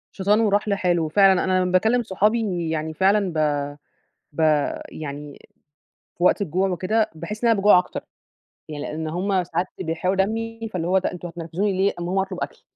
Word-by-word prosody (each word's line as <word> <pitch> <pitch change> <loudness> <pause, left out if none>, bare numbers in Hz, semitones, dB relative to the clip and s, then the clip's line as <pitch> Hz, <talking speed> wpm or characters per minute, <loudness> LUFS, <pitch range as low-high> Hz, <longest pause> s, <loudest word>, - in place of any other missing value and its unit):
شيطان 205 +2 +2
وراح 205 -1 +2
لحاله. 180 -4 +1
وفعلًا 190 +3 +4
أنا 185 0 +2
لمّا 180 - -1
باكلّم 220 +7 +3
صحابي 200 -4 0
يعني 160 0 -3
فعلًا 195 +1 +2
ب 160 - -4 1.0
ب 145 - -6 0.5
يعني 145 -1 -8 0.8
في 175 - -3
وقت 180 - +4
الجوع 190 +1 0
وكده 200 +5 0
باحس 210 +8 -7
إن 235 - +4
أنا 225 - +4
باجوع 205 -1 +6
أكتر. 180 - -6 0.7
يعني 150 -2 -6
لإن 160 +1 -4
هُم 185 +3 0
ساعات 175 +1 -2
بيحرقوا 180 +2 -1
دمي 225 +3 -2
فاللي 170 -2 -2
هو 190 +1 +3
بقى 185 - -2
أنتم 175 0 -7
هتنرفزوني 175 +4 -2
ليه، 190 +1 +1
أمّا 175 - -4
أقوم 190 +2 0
اطلب 190 -1 -2
أكل. - - -6
185 Hz, 180 wpm, -23 LUFS, 170-205 Hz, 1.0 s, باجوع